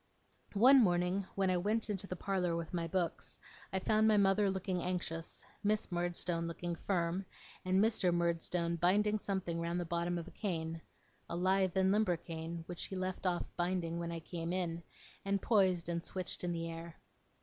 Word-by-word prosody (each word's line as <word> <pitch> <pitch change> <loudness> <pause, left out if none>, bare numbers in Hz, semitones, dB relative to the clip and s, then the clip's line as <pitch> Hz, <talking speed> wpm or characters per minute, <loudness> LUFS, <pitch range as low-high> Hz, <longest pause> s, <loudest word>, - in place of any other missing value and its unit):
One 260 +5 +8
morning 180 +1 +1
when 195 -1 +2
I 180 - +2
went 210 +5 0
into 195 -1 -3
the 185 - -4
parlour 180 -2 0
with 165 0 -4
my 170 -1 -1
books, 175 -1 -2 0.3
I 190 - 0
found 215 +3 +3
my 215 -1 +5
mother 200 0 +4
looking 190 -1 -1
anxious, 175 -2 -3 0.2
Miss 210 -1 +1
Murdstone 175 -1 -1
looking 170 +1 -3
firm, 175 +1 -1 0.4
and 185 +1 +2
Mr. 210 -4 +3
Murdstone 170 0 0
binding 210 +5 +3
something 190 -4 -2
round 170 +1 -1
the 175 - -2
bottom 170 +1 -1
of 170 0 -5
a - - -10
cane 165 -5 -3 0.5
a - - -3
lithe 190 +1 +2
and 190 0 +4
limber 200 -4 +3
cane, 165 0 -6
which 175 0 -5
he 190 - -6
left 185 0 -2
off 175 -1 0
binding 175 -1 -1
when 170 0 -3
I 165 -1 -4
came 165 0 -4
in, 175 -2 -1 0.4
and 200 0 +1
poised 190 -6 +3
and 170 -1 -2
switched 185 0 -3
in 175 - 0
the 165 -1 -2
air. 165 0 -7
180 Hz, 180 wpm, -35 LUFS, 170-195 Hz, 0.5 s, One